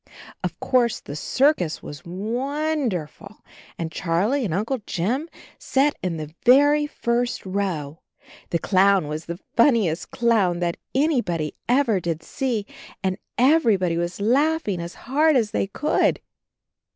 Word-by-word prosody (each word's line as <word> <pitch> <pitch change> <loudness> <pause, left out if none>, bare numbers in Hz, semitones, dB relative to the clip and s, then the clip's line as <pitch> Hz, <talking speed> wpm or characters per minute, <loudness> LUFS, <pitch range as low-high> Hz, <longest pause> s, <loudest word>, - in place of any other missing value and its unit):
Of - - -3
course 245 -3 +2
the 145 - -8
circus 250 - +1
was 145 -2 -9
wonderful, 225 - -3 0.3
and 165 -1 -4
Charlie 195 +14 0
and 200 - -2
Uncle 220 +9 -1
Jim 245 - -1 0.3
sat 280 +2 +1
in 175 -3 -2
the 155 0 -7
very 290 +4 +5
first 240 -4 -1
row. 180 -6 -3 0.5
The 170 - +1
clown 190 -1 +3
was 155 +2 -5
the 170 0 -4 0.2
funniest 225 - +3
clown 220 -7 +2
that 175 -1 -1 0.2
anybody 220 - +1 0.2
ever 245 -6 +3
did 165 -2 -3
see 240 -6 -2 0.4
and 185 -1 -1 0.2
everybody 230 - +3
was 175 +2 -3
laughing 255 - +1
as 170 +1 -7
hard 300 +4 +3
as 225 -5 +2
they - - 0
could. 300 +10 +1
210 Hz, 130 wpm, -23 LUFS, 175-265 Hz, 0.5 s, very